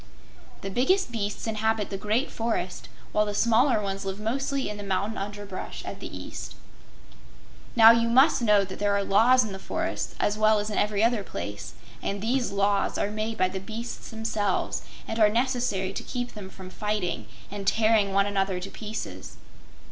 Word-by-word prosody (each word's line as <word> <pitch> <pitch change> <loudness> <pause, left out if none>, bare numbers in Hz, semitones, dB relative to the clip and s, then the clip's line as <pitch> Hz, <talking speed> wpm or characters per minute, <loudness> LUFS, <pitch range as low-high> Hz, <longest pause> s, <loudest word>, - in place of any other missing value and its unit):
The 195 - -5
biggest 315 - +2
beasts 205 -3 -3
inhabit 220 -1 0
the - - -2
great 215 +7 0
forest, 225 -6 -3 0.2
while 210 - +3
the 205 - -3
smaller 235 +2 +4
ones 195 -1 -3
live 195 +1 -4
mostly 270 +5 -1
in 210 - -5
the - - -6
mountain 200 +2 -1
underbrush 205 -1 -6
at - - -6
the - - -6
east. - - -7 1.2
Now, 225 -1 +10
you 230 0 +3
must 265 +4 +5
know 210 -3 +5
that 190 0 -8
there 205 -1 +2
are 200 - +1
laws 240 +6 +5
in 215 - -5
the 190 - -6
forests, - - -3
as 210 +1 0
well 215 0 +5
as 210 +1 -2
in - - -3
every 210 0 +1
other 230 -3 +2
place, 105 - -6 0.3
and 200 - -2
these 245 +4 0
laws 200 0 +1
are 205 - 0
made 215 +1 -3
by 185 - +3
the 190 +1 -4
beasts 225 +5 -6
themselves, 220 -3 -1 0.3
and 225 - -3
are 215 -1 +6
necessary 235 -5 0
to - - -4
keep 245 -1 -4
them 205 -3 -8
from 185 -1 -11
fighting 210 -3 -2 0.2
and 200 -1 -6
tearing 215 -2 +3
one 195 0 +3
another 195 -2 0
to 195 +2 -7
pieces. 215 0 -7
210 Hz, 185 wpm, -27 LUFS, 200-230 Hz, 1.2 s, Now